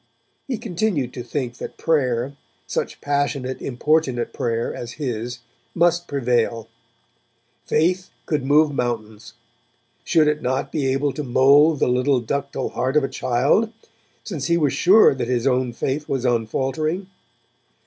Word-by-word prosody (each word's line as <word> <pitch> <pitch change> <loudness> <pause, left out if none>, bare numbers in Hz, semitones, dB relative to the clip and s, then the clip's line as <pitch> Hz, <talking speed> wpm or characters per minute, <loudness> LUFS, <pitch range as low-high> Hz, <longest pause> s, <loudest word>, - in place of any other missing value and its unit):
He 255 -4 -2
continued 180 - -1
to 125 - -6
think 120 0 -4
that - - -7
prayer, 130 -4 0 0.3
such - - -3
passionate 140 -2 -1
importunate 135 -1 0
prayer 115 -1 -2
as 120 -1 -7
his, 125 -3 -4 0.3
must 175 0 +2
prevail. 120 -4 0 1.0
Faith 180 +3 +1 0.2
could 150 -4 -1
move 150 +2 +4
mountains; 110 -4 -4 0.7
should 155 -2 +3
it 150 0 +1
not 130 +2 -1
be 145 -4 -1
able 135 +1 0
to 150 - -4
mould 140 +5 +5
the - - +3
little 125 +2 +2
ductile 140 +4 -3
heart 130 +4 0
of 150 - +3
a - - +1
child, 135 - +1 0.5
since 160 -10 -4
he 170 0 +3
was 145 -5 +1
sure 200 +1 +6
that 125 -3 -3
his 125 -1 0
own 130 -2 +1
faith 135 +5 -3
was 130 -2 -1
unfaltering? 135 - -1
135 Hz, 140 wpm, -22 LUFS, 125-155 Hz, 1.0 s, sure